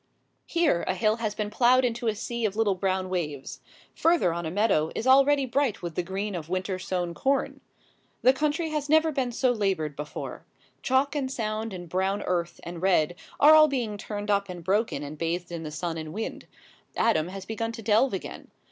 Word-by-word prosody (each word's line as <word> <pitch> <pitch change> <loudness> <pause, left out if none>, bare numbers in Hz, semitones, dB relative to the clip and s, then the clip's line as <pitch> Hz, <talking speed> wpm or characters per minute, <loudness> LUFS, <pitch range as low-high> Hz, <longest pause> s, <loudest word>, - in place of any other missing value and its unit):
Here 330 - +2
a 185 - 0
hill 215 +4 +2
has 215 -3 -2
been 210 -1 -3
ploughed 250 +3 +4
into 235 0 -2
a 220 - +1
sea 235 +2 -4
of 205 -2 -1
little 220 -2 +2
brown 185 0 -1
waves. 150 -7 -4 0.3
Further 330 - +2
on 170 -1 -3
a - - -2
meadow 175 -4 +2
is 225 - -3
already 275 +1 +5
bright 260 -5 0
with 170 -1 -4
the 180 - -1
green 195 +3 -4
of 165 -3 -6
winter 185 +1 -2
sown 180 -2 -2
corn. 275 +7 -1 0.6
The 255 - +6
country 305 +3 -1
has 300 -2 -2
never 315 +1 +4
been 265 -4 -1
so 255 +1 +2
laboured 190 -10 -1
before. 150 +1 -6 0.4
Chalk 270 +3 +1
and 265 -3 -1
sand 220 -2 -3
and 175 -2 -7
brown 190 +4 -1
earth 175 -1 -2
and 170 -1 -7
red 175 -4 +3 0.3
are 300 +2 +8
all 310 0 +8
being 245 -7 -2
turned 205 0 -4
up 200 -1 +1
and 175 -2 -7
broken 195 -4 0
and 145 +1 -8
bathed 170 +2 -2
in 170 -1 -4
the 155 - -5
sun 165 +1 -4
and 155 0 -7
wind. 220 +3 -5 0.5
Adam 165 -9 +2
has 190 +1 -7
begun 225 +1 -3
to 225 - -8
delve 225 +5 +3
again. 190 - -8
205 Hz, 200 wpm, -27 LUFS, 175-250 Hz, 0.6 s, are